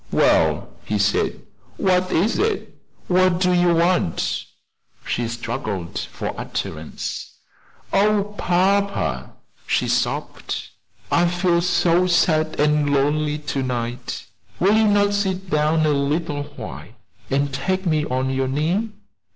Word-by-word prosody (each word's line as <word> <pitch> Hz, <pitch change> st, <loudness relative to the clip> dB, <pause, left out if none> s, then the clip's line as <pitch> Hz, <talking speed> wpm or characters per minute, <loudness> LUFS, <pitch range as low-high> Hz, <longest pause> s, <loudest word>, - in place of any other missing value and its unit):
"Well," -, -, +3 dB
he 105 Hz, -, -1 dB
said, 105 Hz, +1 st, 0 dB, 0.3 s
"what 185 Hz, -1 st, +2 dB
is 200 Hz, +8 st, +2 dB
it 430 Hz, -1 st, -1 dB, 0.3 s
what 185 Hz, -1 st, +3 dB
do 180 Hz, -1 st, +3 dB
you 175 Hz, -1 st, +4 dB
want?" 170 Hz, -, +1 dB, 0.6 s
She 120 Hz, -, -1 dB
struggled 115 Hz, -, -4 dB
for -, -, -5 dB
utterance. -, -, -5 dB, 0.6 s
"Oh, 205 Hz, 0 st, +2 dB
papa!" 200 Hz, +2 st, 0 dB, 0.3 s
she -, -, +1 dB
sobbed, -, -, -2 dB, 0.4 s
"I 175 Hz, +1 st, +4 dB
feel 175 Hz, 0 st, +2 dB
so 175 Hz, 0 st, +3 dB
sad 155 Hz, -3 st, +2 dB
and 150 Hz, -1 st, +2 dB
lonely 150 Hz, +2 st, +1 dB, 0.2 s
to 135 Hz, -, 0 dB
night 120 Hz, -1 st, -4 dB, 0.3 s
will 200 Hz, +4 st, +4 dB
you 220 Hz, 0 st, +4 dB
not 205 Hz, 0 st, +3 dB
sit 190 Hz, -2 st, -2 dB
down 155 Hz, +1 st, +2 dB
a -, -, +3 dB
little 145 Hz, +1 st, -1 dB
while -, -, -8 dB, 0.4 s
and 140 Hz, 0 st, 0 dB
take 190 Hz, +7 st, -1 dB
me 155 Hz, -3 st, +2 dB
on 130 Hz, 0 st, -1 dB
your 135 Hz, 0 st, 0 dB
knee? 165 Hz, +11 st, 0 dB
170 Hz, 125 wpm, -22 LUFS, 140-185 Hz, 0.6 s, you